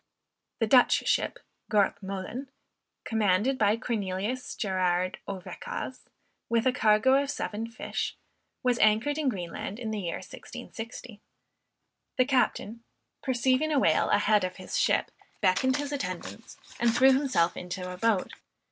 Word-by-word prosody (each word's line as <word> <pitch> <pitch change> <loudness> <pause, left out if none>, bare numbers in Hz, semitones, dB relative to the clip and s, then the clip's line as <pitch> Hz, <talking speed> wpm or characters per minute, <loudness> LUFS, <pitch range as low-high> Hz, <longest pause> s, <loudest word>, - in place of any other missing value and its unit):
The 225 - +1
Dutch 245 +3 +4
ship - - +1 0.3
Gort 200 -1 +2
Moolen, 195 +8 -5 0.5
commanded 220 +4 +1
by 210 +1 +3
Cornelius 215 +2 -3
Gerard 185 -2 0
Ouwekaas, 190 -2 -6 0.4
with 230 0 +2
a 255 - +5
cargo 235 +5 +4
of 280 - -4
seven 225 -5 -3
fish, 230 - -4 0.5
was 250 -1 +2
anchored 220 +8 +3
in 290 -4 +2
Greenland 190 -1 -5
in 230 -3 -4
the 215 - -2
year 175 -4 -3
1660. 225 -1 -9 1.0
The 255 - +4
captain, 235 -3 0 0.4
perceiving 260 +4 +1
a 295 - +2
whale 165 -12 +3
a - - +5
head 205 -1 +3
of 185 0 -3
his 185 - -7
ship, - - +2 0.3
beckoned 240 +8 +2
his 290 0 -3
attendants, 210 -3 -5 0.2
and 235 -1 +3
threw 265 +2 +7
himself 260 -12 +2
into 180 0 -5
a - - -9
boat. 215 -1 +1
220 Hz, 140 wpm, -28 LUFS, 190-255 Hz, 1.0 s, threw